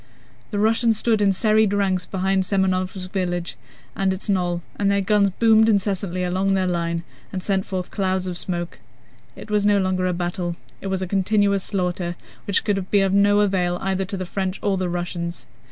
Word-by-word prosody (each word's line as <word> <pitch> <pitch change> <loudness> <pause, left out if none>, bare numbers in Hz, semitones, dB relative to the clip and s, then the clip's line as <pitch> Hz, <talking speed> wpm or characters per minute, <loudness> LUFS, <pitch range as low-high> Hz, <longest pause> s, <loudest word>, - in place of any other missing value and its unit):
The 205 - -3
Russians 225 +1 +3
stood 220 -1 +1
in 200 -1 +4
serried 215 +1 +3
ranks 190 -3 0
behind 190 0 0
Semënovsk 185 -1 -1
village 175 -3 -2 0.4
and 195 -1 +1
its 190 +2 -4
knoll, 175 -3 0
and 200 -1 +1
their 200 0 +2
guns 200 0 +3
boomed 220 +3 +4
incessantly 195 -3 0
along 190 +2 +1
their 190 -1 +1
line 170 -1 -1 0.3
and 185 -2 -4
sent 195 -2 0
forth 185 -2 -4
clouds 190 -2 -1
of 180 -1 -4
smoke. 175 -1 -4 0.6
It 215 - -10
was 210 -1 +2
no 205 0 +4
longer 185 -1 +1
a 180 - 0
battle: 175 0 -3 0.3
it - - -5
was 190 -1 -1
a - - -3
continuous 200 +1 +2
slaughter 180 -3 -2 0.3
which 200 - +2
could 195 -3 -1
be 205 - +4
of 195 -1 +1
no 205 +1 +4
avail 180 -3 +1
either 190 0 -1
to 195 +1 -5
the 185 - -4
French 190 +1 -3
or 200 -1 +2
the 185 -1 -1
Russians. 175 -1 -4
190 Hz, 190 wpm, -22 LUFS, 180-200 Hz, 0.6 s, in